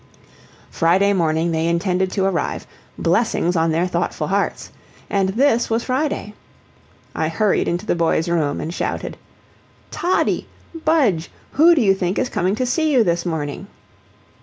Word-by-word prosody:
Friday 190 +5 +3
morning 165 -2 +1
they 160 0 0
intended 180 +2 0
to 190 0 -1
arrive, 180 -6 -2 0.3
blessings 175 -1 +1
on 165 0 +2
their 165 +3 +1
thoughtful 180 - -2
hearts! - - -1 0.4
and 195 -2 +1
THIS 240 +3 +2
was 230 +1 0
Friday. 260 -5 -2 0.8
I 160 - -1
hurried 200 +6 +1
into 175 +4 -2
the - - +1
boys' 165 -1 +1
room, 160 -4 0
and 165 - -4
shouted: - - -3 0.8
"Toddie! 360 +2 0 0.3
Budge! 290 - +1 0.2
who 335 +4 +5
do 290 - +2
you 195 -2 +5
think 185 -1 -2
is 250 - 0
coming 185 +3 0
to 255 - -1
see 310 +5 +1
you 255 -5 +4
this 170 -2 -1
morning?" 150 -4 -4
185 Hz, 150 wpm, -20 LUFS, 170-230 Hz, 0.8 s, who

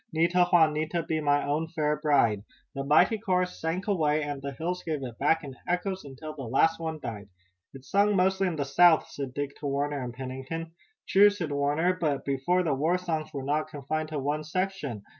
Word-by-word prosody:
Nita! 170 +2 +3
Juanita! 160 0 +3
Be 160 -1 -2
my 145 -1 +2
own 150 +3 -1
fair 150 -2 0
bride." 140 -9 +2 0.3
The 135 - -3
mighty 175 +10 +4
chorus 180 -3 -1
sank 165 +4 -2
away 155 -6 +1
and 145 -1 -4
the 140 0 -4
hills 175 +6 -3
gave 155 -5 -3
it 120 -3 -7
back 160 +3 +2
in 135 -3 -8
echoes 185 +2 -1
until 145 +3 -8
the 150 - -9
last 135 +7 +2
one 160 -1 -3
died. 105 -6 -7 0.5
"It's 135 0 -13
sung 205 +1 +3
mostly 190 +1 +2
in 175 - -2
the 145 -2 -2
South," 160 +4 +5
said 135 -3 -6
Dick 145 -1 -3
to 145 - -5
Warner 140 0 -1
and 125 - -5
Pennington. 135 +6 -6 0.4
"True," 205 +2 +7
said 185 -7 -4
Warner, 145 +5 +1
"but 155 -6 -2
before 140 +7 +1
the 155 -4 +1
war 160 +7 +1
songs 160 -4 -3
were 140 -3 -5
not 150 +3 0
confined 155 +1 -4
to 155 - -4
one 145 +2 -1
section. 155 - -3
155 Hz, 200 wpm, -28 LUFS, 140-175 Hz, 0.5 s, True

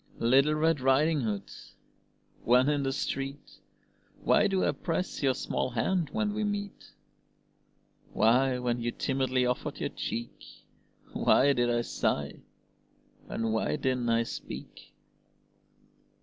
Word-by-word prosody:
Little 135 +6 +3
Red 160 0 +2
Riding 140 +4 +3
Hood, 105 -4 -3 0.9
when 125 +4 +4
in 145 -1 +1
the 135 -1 -1
street, 135 0 -4 0.6
Why - - +4
do 190 -2 +1
I - - +2
press 175 +2 -3
your 135 -3 +2
small - - -2
hand 155 +9 0
when 215 -1 -1
we 215 +1 -2
meet? 205 -1 -4 1.2
Why, 125 +4 +3
when 120 -1 -1
you 120 0 -1
timidly 130 0 0
offered 125 0 -2
your - - -2
cheek, 115 +1 -5 0.7
Why 140 +1 +4
did 120 -2 +1
I 120 0 +1
sigh, 70 -10 -2 0.9
and 115 -1 -2
why 110 - 0
didn't 130 -4 -1
I 115 0 +3
speak? - - -9
130 Hz, 125 wpm, -29 LUFS, 120-150 Hz, 1.2 s, when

